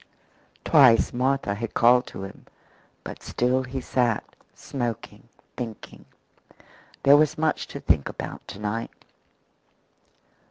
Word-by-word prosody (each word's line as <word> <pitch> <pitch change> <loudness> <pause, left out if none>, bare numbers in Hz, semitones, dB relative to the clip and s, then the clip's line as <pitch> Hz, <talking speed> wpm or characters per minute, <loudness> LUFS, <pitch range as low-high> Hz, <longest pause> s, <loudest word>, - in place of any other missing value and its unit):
Twice 135 -7 +5
Martha 130 -3 0
had 110 +2 -6
called 125 +1 +5
to - - -8
him, 95 - -11 0.6
but - - -8
still 125 +2 0
he 130 +1 -5
sat, 120 -3 0 0.3
smoking, 120 -5 -5 0.3
thinking. 115 -3 -8 1.0
There 140 +1 +7
was 150 0 +2
much 155 0 0
to - - -8
think 70 - +1
about - - -7
to - - -8
night. 105 +2 -5
125 Hz, 115 wpm, -25 LUFS, 115-135 Hz, 1.0 s, There